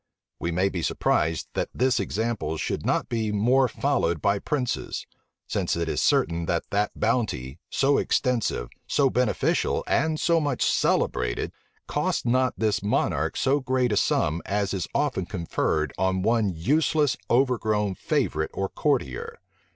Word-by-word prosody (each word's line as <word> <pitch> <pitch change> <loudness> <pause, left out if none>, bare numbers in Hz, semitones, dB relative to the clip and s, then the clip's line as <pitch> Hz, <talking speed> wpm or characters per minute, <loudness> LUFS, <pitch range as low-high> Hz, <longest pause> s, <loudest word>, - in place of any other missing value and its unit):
We 85 - -2
may 90 +3 +2
be 90 -3 -3
surprised 80 0 0
that - - -1
this 130 0 +2
example 110 -9 -2
should - - -3
not - - +1
be 110 -2 -1
more 125 +6 +3
followed 120 - 0
by 100 +5 +1
princes; 125 -2 -2 0.4
since - - -1
it 85 -1 -2
is - - -1
certain 85 0 +2
that 85 - 0
that 105 +1 -1
bounty, 95 - -1
so 140 +1 +2
extensive, 120 - 0 0.2
so 135 -2 +2
beneficial, 125 -3 +1
and 160 -1 +1
so 170 -1 +3
much 145 -5 0
celebrated, - - +1 0.3
cost - - -1
not 130 +1 +2
this 110 -2 +1
monarch 100 - 0
so 135 +2 +2
great 130 -2 0
a - - +2
sum 80 -2 +1
as 100 -1 -1
is 95 -3 -2
often 130 -12 0
conferred 80 -5 -1
on 95 0 +1
one 115 -1 +2
useless, 145 - +1
overgrown 110 -5 +2
favorite 80 -3 -1
or 95 0 -1
courtier. 125 - -1
110 Hz, 145 wpm, -25 LUFS, 85-130 Hz, 0.4 s, more